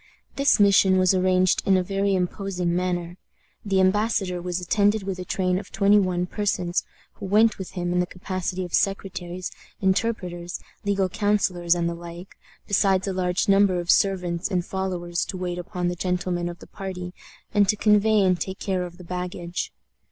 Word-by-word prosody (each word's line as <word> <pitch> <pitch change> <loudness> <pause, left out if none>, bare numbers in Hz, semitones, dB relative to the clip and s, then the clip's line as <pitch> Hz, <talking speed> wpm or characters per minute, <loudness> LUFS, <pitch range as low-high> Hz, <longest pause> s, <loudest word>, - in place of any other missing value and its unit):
This 275 -4 +3
mission 195 -2 +5
was 185 0 +4
arranged 185 0 +3
in 195 -1 +4
a 185 - +1
very 195 +1 0
imposing 180 -1 -1
manner. 175 -1 -2 0.5
The 195 -2 +1
embassador 190 -1 +1
was 180 0 -2
attended 205 +3 +2
with 190 -1 -4
a - - -3
train 185 -1 0
of 200 - -11
twenty 205 0 +4
one 180 -2 0
persons, 190 -3 -1 0.4
who 200 - -5
went 215 +2 +3
with 190 -1 -7
him 175 -1 -2
in 180 - +1
the 180 - +1
capacity 185 0 -4
of 175 - -11
secretaries, 185 -2 -2 0.3
interpreters, 185 -3 -1 0.2
legal 200 -2 +1
councilors, 185 -3 +1
and 170 -1 0
the 170 - -2
like, 170 +2 -10 0.3
besides 195 -1 +2
a 195 - -1
large 180 -1 0
number 195 -2 +4
of 175 0 +2
servants 180 -3 +1
and 180 -3 -1
followers 180 -3 -2
to 185 - -6
wait 180 -1 -3
upon 180 0 -3
the 175 - -1
gentlemen 180 -1 -1
of 175 - -8
the - - -13
party, 180 -2 -6 0.4
and 205 -2 +3
to - - +4
convey 210 0 +4
and 185 -2 +2
take 190 0 -3
care 185 -3 -2
of 175 0 -14
the 180 - -11
baggage. 180 0 -4
185 Hz, 180 wpm, -24 LUFS, 180-195 Hz, 0.5 s, mission